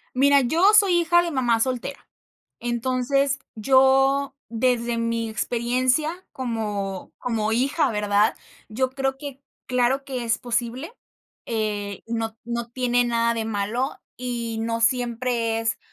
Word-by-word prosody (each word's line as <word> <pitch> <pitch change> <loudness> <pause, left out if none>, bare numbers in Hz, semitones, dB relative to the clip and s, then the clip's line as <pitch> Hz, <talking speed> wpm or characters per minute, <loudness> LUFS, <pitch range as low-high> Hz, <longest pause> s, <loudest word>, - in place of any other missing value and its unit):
Mira, 280 +1 +5
yo 335 - +4
soy 400 -4 +6
hija 345 +1 +4
de 340 - -2
mamá 240 -5 +1
soltera. 255 +2 -2 0.6
Entonces 255 +3 0 0.2
yo, 270 +4 +3
desde 235 0 0
mi 230 0 -1
experiencia 255 - 0
como 210 -6 -4
como 220 -3 -1
hija, 275 +4 +1
¿verdad? 210 +1 +2 0.3
Yo 255 +4 -1
creo 270 0 -2
que 280 -2 -8 0.3
claro 255 +2 +1
que 255 -3 -4
es 225 -1 +1
posible, 245 - -3 0.5
eh, 210 -3 -3
no 225 -1 -3
no 235 0 -4
tiene 245 -1 +1
nada 235 0 +1
de 225 -1 -2
malo, 220 +5 -2 0.2
y 235 -2 -4
no 230 0 -2
siempre 235 -1 0
es 225 0 -1
240 Hz, 130 wpm, -24 LUFS, 230-265 Hz, 0.6 s, soy